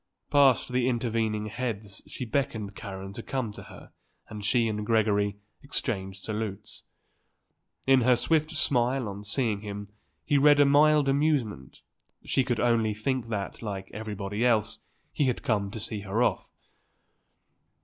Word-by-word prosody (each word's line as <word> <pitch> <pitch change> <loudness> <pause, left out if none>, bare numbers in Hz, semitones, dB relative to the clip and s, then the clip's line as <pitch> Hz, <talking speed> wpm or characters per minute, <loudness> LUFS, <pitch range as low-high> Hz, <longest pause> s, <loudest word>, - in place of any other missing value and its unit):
Past 135 -3 +4
the 125 0 +2
intervening 115 -3 0
heads 105 -3 -5
she 125 - -6
beckoned 110 -5 -2
Karen 95 -2 -7
to 115 - -6
come 125 -3 -3
to - - -10
her - - -14 0.4
and 105 -2 -7
she 115 +2 +2
and 105 -1 -2
Gregory 105 -2 +1 0.2
exchanged 100 -9 -3
salutes. 105 -2 -5 1.0
In 135 -1 +5
her 125 +1 +5
swift 155 +5 +1
smile 130 -5 +1
on 100 0 -7
seeing 105 -1 0
him 105 -1 -6 0.4
he 145 - +3
read 145 +1 +6
a 145 - +7
mild 150 +1 +5
amusement; 135 - 0 0.4
she 135 - +2
could 125 -3 -1
only 115 -3 +2
think 125 +2 -2
that, 105 -3 -4
like 100 -3 -5
everybody 105 0 -4
else, 115 -4 +2 0.3
he 145 - +1
had 125 -2 -1
come 100 -3 0
to 110 - -7
see 105 0 -3
her 105 +4 0
off. - - 0
115 Hz, 150 wpm, -28 LUFS, 105-130 Hz, 1.0 s, a